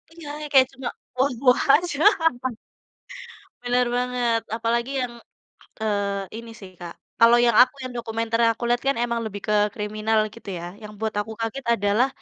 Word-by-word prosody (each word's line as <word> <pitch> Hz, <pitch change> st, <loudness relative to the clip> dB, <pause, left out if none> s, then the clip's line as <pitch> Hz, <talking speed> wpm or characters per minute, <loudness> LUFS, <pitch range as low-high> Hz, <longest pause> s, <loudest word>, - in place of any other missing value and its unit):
Iya, 335 Hz, -3 st, -11 dB
yang 300 Hz, -1 st, -7 dB
kayak 260 Hz, -2 st, +7 dB
cuma, 265 Hz, -2 st, -7 dB, 0.3 s
wah 265 Hz, +2 st, +2 dB
wah 250 Hz, 0 st, +5 dB
aja. 315 Hz, -2 st, -1 dB, 1.6 s
Benar 245 Hz, 0 st, +2 dB
banget, 245 Hz, -2 st, 0 dB, 0.2 s
apalagi 235 Hz, +2 st, -1 dB
yang, 245 Hz, -1 st, -4 dB, 0.7 s
eee, 200 Hz, -2 st, -1 dB
ini 230 Hz, 0 st, -10 dB
sih, 195 Hz, -2 st, -10 dB
Kak, 170 Hz, -1 st, -7 dB, 0.3 s
kalau 230 Hz, +1 st, +7 dB
yang 235 Hz, -2 st, +3 dB
aku 255 Hz, +2 st, +1 dB
yang 255 Hz, -, -6 dB
dokumenter 230 Hz, 0 st, -2 dB
yang 230 Hz, 0 st, +5 dB
aku 240 Hz, -, -6 dB
lihat 240 Hz, 0 st, +1 dB
kan 275 Hz, -, +2 dB
memang 235 Hz, -1 st, -1 dB
lebih 205 Hz, -1 st, -6 dB
ke, 210 Hz, -, +2 dB, 0.2 s
kriminal, 215 Hz, +1 st, -1 dB, 0.2 s
gitu 230 Hz, -, -14 dB
ya. 170 Hz, -, -7 dB, 0.2 s
Yang 210 Hz, 0 st, -9 dB
buat 220 Hz, -1 st, -2 dB
aku 220 Hz, +2 st, -5 dB
kaget 225 Hz, +4 st, -3 dB
adalah, 205 Hz, +4 st, +2 dB
230 Hz, 170 wpm, -24 LUFS, 215-250 Hz, 1.6 s, kayak